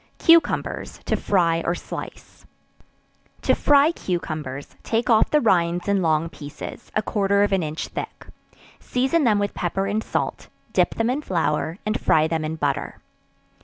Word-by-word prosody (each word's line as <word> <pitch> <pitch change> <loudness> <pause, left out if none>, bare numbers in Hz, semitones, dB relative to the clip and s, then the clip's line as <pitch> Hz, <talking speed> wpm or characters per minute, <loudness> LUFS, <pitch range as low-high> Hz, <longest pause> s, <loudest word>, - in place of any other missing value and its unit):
Cucumbers, 330 0 +2
to - - +1
Fry 170 -4 +1
or 170 - 0
Slice. - - -9 1.0
To - - +3
fry 290 +2 +4
cucumbers, 155 - -5
take 230 +2 0
off 220 -1 +4
the 300 - +4
rinds 175 -6 +1
in 200 -1 +2
long 160 -1 +1
pieces, 145 -3 -9
a 215 - +1
quarter 200 -1 +2
of 205 - +1
an 195 -1 +2
inch 155 0 -4
thick; - - -7 0.5
season 265 +5 +1
them 215 -3 +4
with 205 0 -1
pepper 195 +2 -2
and 210 +2 -1
salt; - - -3 0.3
dip - - +2
them 225 +2 +1
in 280 +4 -1
flour, 165 - -1
and 215 +1 -1
fry 155 0 +3
them 160 -1 -1
in 155 +1 -3
butter. 145 -3 -2
190 Hz, 160 wpm, -23 LUFS, 160-220 Hz, 1.0 s, fry